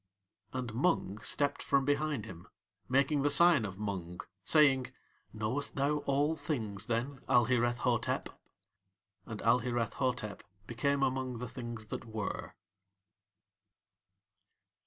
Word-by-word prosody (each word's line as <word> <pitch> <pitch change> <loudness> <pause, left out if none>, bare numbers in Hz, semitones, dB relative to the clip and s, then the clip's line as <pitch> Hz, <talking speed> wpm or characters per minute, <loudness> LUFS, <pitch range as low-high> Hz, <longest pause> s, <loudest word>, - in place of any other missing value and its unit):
And 125 -3 -4
Mung 115 - +1
stepped 145 +5 0
from 135 -1 +2
behind 145 -5 0
him, 90 -5 -10 0.4
making 140 +2 +3
the 145 - +3
sign 165 -4 +6
of 95 -2 -6
Mung, 95 -4 -4 0.2
saying: 135 - +4 0.4
"Knowest 110 +7 -2
thou 145 +2 +1
All 145 +3 +2
Things, 110 -9 -3
then, 125 +4 -2
Alhireth 120 0 +3
Hotep?" 120 -2 0 1.0
And 110 -2 -6
Alhireth 120 -1 +2
Hotep 125 -5 -2 0.2
became 135 +5 0
among 130 -2 -1
the 125 +2 -5
Things 120 -3 -7
that - - -5
Were. 110 -2 -5
125 Hz, 115 wpm, -32 LUFS, 110-140 Hz, 1.0 s, sign